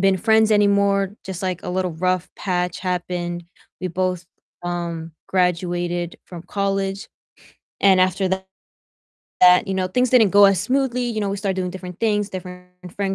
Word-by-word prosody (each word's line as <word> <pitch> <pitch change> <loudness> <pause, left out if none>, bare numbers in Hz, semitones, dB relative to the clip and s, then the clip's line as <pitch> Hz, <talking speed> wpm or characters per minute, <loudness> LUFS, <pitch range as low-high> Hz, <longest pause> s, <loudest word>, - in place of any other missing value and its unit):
been 195 -1 +3
friends 220 +2 +3
anymore, 200 -1 +2
just, 190 -1 -6
like, 180 -2 -2
a - - -4
little 185 -1 -1
rough 180 +2 -1
patch 180 -2 -2
happened. 175 -1 -3 0.4
We 185 - -2
both, 180 0 -2 0.4
um, 170 -2 -4 0.2
graduated 175 -1 -1
from 175 -2 -9
college, 195 0 -2 0.7
and 190 -2 +5
after 185 +1 +1 1.1
that, 180 +2 +6
you 190 - -2
know, 185 -1 0
things 250 +5 +1
didn't 225 -6 +5
go 205 +1 +7
as 195 -2 +3
smoothly, 250 +2 0
you 230 -3 -2
know, 200 - -1
we 200 - -2
started 195 -1 -2
doing 180 -1 -2
different 180 -1 -9
things, 210 -3 +1
different 180 -1 -8 0.3
friend 195 -1 -1
185 Hz, 160 wpm, -21 LUFS, 180-200 Hz, 1.1 s, go